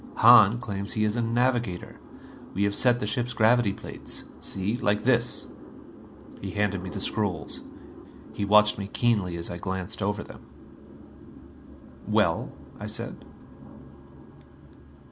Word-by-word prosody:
Hahn 115 -2 +7
claims 100 -4 -5
he 110 - 0
is 105 0 0
a 120 - 0
navigator. 120 -5 -1 0.6
We 100 - +1
have 100 0 +1
set 120 +3 +3
the 105 - -2
ship's 120 +3 -2
gravity 110 -1 +4
plates - - -8 0.2
see, 100 +4 -3
like 105 -3 0
this." 120 -1 +1 1.0
He - - -5
handed 105 -2 -1
me 95 - -6
the 100 - -5
scrolls. 100 -4 -2 0.7
He - - -3
watched 105 +1 +5
me 100 - -4
keenly 100 -6 0
as 85 0 -3
I 85 - -5
glanced 95 +2 -3
over 105 +1 -1
them. - - -13 1.7
"Well?" 105 -6 +1 0.3
I - - -6
said. - - -4
105 Hz, 130 wpm, -26 LUFS, 100-115 Hz, 1.7 s, Hahn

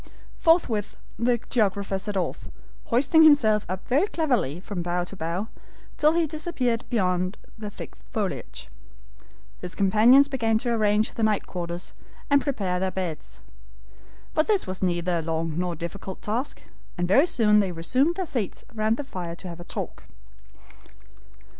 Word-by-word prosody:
Forthwith 245 - +2 0.2
the 240 +1 +3
geographer 200 -4 +1
set 205 0 -3
off, 185 - -3 0.4
hoisting 275 +7 +4
himself 230 -9 +5
up 185 +1 -5
very 290 +10 +3
cleverly 250 - 0
from 190 -1 -5
bough 175 +1 -1
to 180 - -8
bough, 175 +4 -3 0.5
till 305 +1 +4
he 335 0 +2
disappeared 290 -7 -2
beyond 185 -3 0 0.2
the 215 -2 -6
thick 205 - -9 0.2
foliage. 180 - -4 0.9
His 180 0 -7
companions 220 +8 +6
began 230 -5 +1
to 240 +2 -1
arrange 215 -1 +2
the - - -5
night 215 -2 +2
quarters, 175 0 -5 0.4
and 285 0 +5
prepare 195 -11 -1
their 190 0 0
beds. 180 -5 -5 0.9
But 310 - +2
this 415 -3 +2
was 185 -1 -4
neither 175 -1 +1
a - - -2
long 160 0 -2
nor 180 -1 -1
difficult 170 +4 -7
task, 240 +7 -2 0.3
and 175 0 0
very 270 - +5
soon 210 -8 +4
they 195 -3 +1
resumed 255 - +1
their 375 - -2
seats 240 - -4
round 220 +1 +1
the 290 - -3
fire 180 -10 -6
to 185 - -9
have 170 0 -8
a - - -7
talk. - - -6
210 Hz, 155 wpm, -25 LUFS, 180-250 Hz, 0.9 s, companions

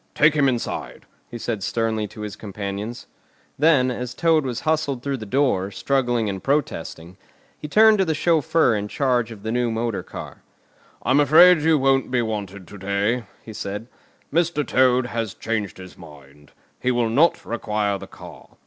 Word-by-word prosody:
"Take 150 0 +5
him 145 -3 +3
inside," 120 -3 -4 0.2
he 120 - -7
said 115 -3 -3
sternly 110 +1 -1
to 105 - -11
his 105 -2 -6
companions. 105 +2 -6 0.5
Then, 140 -5 +4
as 125 0 -5
Toad 165 -2 +2
was 125 -3 -3
hustled 155 -5 -1
through 140 -1 -2
the 110 -3 -8
door, 125 -6 +1
struggling 120 -1 0
and 95 -2 -4
protesting, 90 - -2 0.4
he 150 - -8
turned 215 +5 +5
to 190 - +3
the 160 -2 0
chauffeur 160 -4 +2
in 105 0 -3
charge 125 -1 0
of 105 -3 -11
the 110 - -3
new 120 0 0
motor 115 -1 -2
car. - - -10 0.6
"I'm 130 +3 +3
afraid 160 +4 +7
you 160 0 +3
won't 135 -1 +2
be 125 -2 +1
wanted 100 -4 -5
to 100 - -11
day," 100 +5 -1 0.2
he 110 - -10
said. 105 +2 -5 0.5
"Mr. 165 -3 +1
Toad 130 -1 +3
has 115 -5 -4
changed 110 -4 -3
his 95 -1 -11
mind. 75 -3 -16 0.3
He 125 - -1
will 120 -2 +1
not 150 +9 +2
require 105 -3 -2
the - - -9
car. - - -13
120 Hz, 175 wpm, -22 LUFS, 105-140 Hz, 0.6 s, afraid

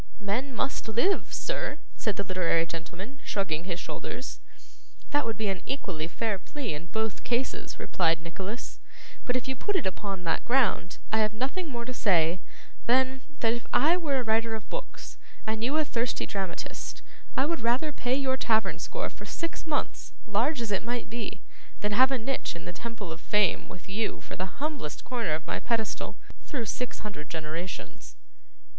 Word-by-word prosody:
'Men 225 +7 0
must 265 +1 0
live, 240 - +3
sir,' - - -1 0.2
said 210 -3 0
the 200 - 0
literary 180 -3 +3
gentleman, 180 +10 -6
shrugging 175 -5 0
his 175 -2 -1
shoulders. 255 +7 -4 0.7
'That 290 -3 +3
would 225 - -1
be 220 -2 +1
an 195 -2 0
equally 185 - -1
fair 210 +3 0
plea 275 - -3
in 150 +3 -5
both 220 +3 -1
cases,' 245 +2 0
replied 165 -2 +3
Nicholas; 190 +7 -5 0.5
'but 245 - +3
if 255 - 0
you 265 - 0
put 410 - 0
it 375 - +2
upon 190 0 -2
that 165 -1 +1
ground, 235 -7 +3
I 220 - +4
have 215 0 +3
nothing 275 +10 -1
more 235 -3 -3
to 255 - -3
say, 175 -6 +4 0.5
than, 260 +2 +4 0.2
that 225 -1 +5
if 240 -1 -4
I 315 +7 +6
were 305 -6 +2
a 255 - +1
writer 225 0 +3
of 220 - -8
books, - - -6 0.3
and 220 0 0
you 275 +6 +3
a 310 - +4
thirsty 240 -3 0
dramatist, 190 -3 -3 0.3
I 265 - +5
would 335 +2 0
rather 245 +7 +2
pay 250 -1 +1
your 265 -1 +2
tavern 220 -4 +3
score - - -2
for - - -9
six 335 -1 -3
months, 300 -2 -1
large 235 +6 +2
as 225 -3 -1
it 195 - +2
might 240 0 -2
be, 220 -4 -3 0.4
than 210 - +1
have 255 +5 +7
a 270 - +2
niche 255 -4 -1
in 170 - -7
the 175 - -4
Temple 225 -6 -5
of 165 +1 -6
Fame 210 -2 +3
with 180 - -9
you 210 +3 0
for - - -7
the 185 - -1
humblest 285 - -2
corner 230 -11 +1
of 160 0 -5
my - - 0
pedestal, 230 -3 0 0.3
through 255 -7 -2
six 250 +4 -2
hundred 175 -8 -5
generations. 165 - -4
225 Hz, 185 wpm, -30 LUFS, 190-260 Hz, 0.7 s, have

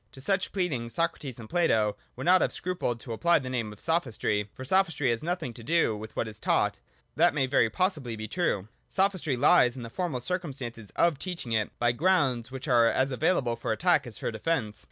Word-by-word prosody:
To - - -12
such 190 +7 0
pleading 150 -12 -2
Socrates 140 -2 -2
and 110 - -9
Plato 110 -12 +2 0.2
would - - -6
not 185 +1 +6
have - - +1
scrupled 180 -10 -2
to 120 - -6
apply 170 +9 +3
the 130 -2 -4
name 115 -4 -2
of 105 - -13
Sophistry. 115 -10 0
For 130 - -8
Sophistry 165 -5 +2
has 115 - -1
nothing 170 -7 -3
to 115 0 -11
do 165 -4 +2
with 110 +1 -9
what 110 - -1
is 105 -1 -8
taught - - +1 0.2
:— - - -38
that - - +4
may 140 -3 +2
very 130 -4 +3
possibly 150 - -1
be 110 0 -6
true. 110 - -1 0.2
Sophistry 190 -8 0
lies 120 0 +5
in 125 - -7
the 115 - -8
formal 170 -6 -2
circumstance 130 - -4
of 170 -5 +2
teaching 175 -10 -5
it 110 -2 +1
by 120 0 +2
grounds 130 -5 +1
which 130 +2 -7
are 120 -3 +5
as 130 +3 +1
available 130 -2 +1
for 115 - -3
attack 145 +2 +2
as 115 - -5
for - - -3
defence. 110 -2 -2
130 Hz, 215 wpm, -28 LUFS, 115-170 Hz, 0.2 s, not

